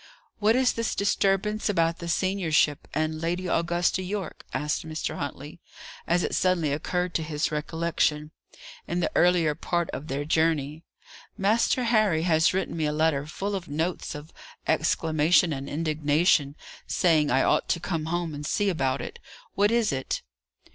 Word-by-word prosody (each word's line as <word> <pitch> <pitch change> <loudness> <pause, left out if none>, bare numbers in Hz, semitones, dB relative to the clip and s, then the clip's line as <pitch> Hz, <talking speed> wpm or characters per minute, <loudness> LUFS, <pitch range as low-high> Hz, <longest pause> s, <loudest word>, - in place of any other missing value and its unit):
"What 215 +2 +3
is 255 -1 +3
this 230 -1 -2
disturbance 200 +1 +1
about 165 -4 +1
the 170 - -6
seniorship, 170 -5 +1
and 155 0 -2
Lady 175 +2 -2
Augusta 175 +1 +1
Yorke?" 190 -1 -5
asked 150 0 -2
Mr. 155 -1 -4
Huntley, 145 +3 -6 0.5
as 175 +1 +2
it - - -2
suddenly 170 -5 +1
occurred 180 +4 -2
to - - 0
his 155 0 -2
recollection, 155 -1 -1 0.6
in 175 - -1
the 170 - 0
earlier 175 -3 +3
part 170 +2 -2
of 150 - -6
their 140 +2 -3
journey. 155 -1 +1 0.6
"Master 225 +5 +2
Harry 215 -9 +2
has 160 -2 +3
written 190 -2 -2
me 160 -2 -1
a - - 0
letter 150 -2 +1
full 200 +6 -4
of 190 -3 -4
notes 160 +4 -3
of 150 +2 -10 0.3
exclamation 160 +1 +2
and 135 0 -5
indignation, 150 -1 +1 0.3
saying 155 -4 +2
I 130 +2 +3
'ought - - +1
to 170 - +1
come 165 -2 -3
home 170 -1 -2
and 145 0 -6
see 205 +7 0
about 135 -7 0
it.' 475 - -7 0.3
What 205 +1 +3
is 230 -1 +2
it?" 130 -1 -3
165 Hz, 160 wpm, -26 LUFS, 150-185 Hz, 0.6 s, What